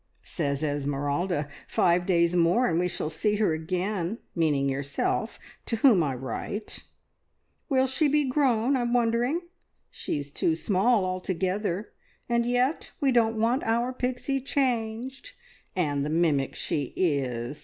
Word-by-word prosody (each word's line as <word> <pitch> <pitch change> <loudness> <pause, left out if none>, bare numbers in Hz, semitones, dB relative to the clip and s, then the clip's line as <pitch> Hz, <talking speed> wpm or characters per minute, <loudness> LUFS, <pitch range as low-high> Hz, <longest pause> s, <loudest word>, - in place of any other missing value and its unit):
Says 140 -3 -2
Esmeralda, 145 +3 -1 0.2
`Five 175 0 +2
days 170 -1 +3
more, 175 +9 +3
and 165 0 +1
we 180 - +1
shall 165 -3 -3
see 210 +5 0
her 205 -6 +2
again,' 180 +4 -2 0.2
meaning 150 -4 +1
yourself, 140 +10 -1 0.3
to 230 - 0
whom 225 -5 +5
I 140 -4 0
write. 135 - -5 0.8
`Will 265 -2 +3
she 265 +4 +2
be 295 0 +2
grown, 255 -2 +2
I'm 240 -2 0
wondering! 240 +6 +1 0.5
She's 145 -1 -4
too 160 +2 +1
small 200 +4 +2
altogether, 185 +2 -2 0.4
and 235 0 +1
yet 250 +5 0
we 280 -4 +2
don't 225 -2 +2
want 235 +4 +2
our 235 +3 0
Pixie 255 +2 -2
changed. 260 - -2 0.4
And 145 -6 0
the 150 - -2
mimic 155 -4 +1
she 140 -4 -2
is! 140 -5 -1
190 Hz, 135 wpm, -27 LUFS, 155-245 Hz, 0.8 s, whom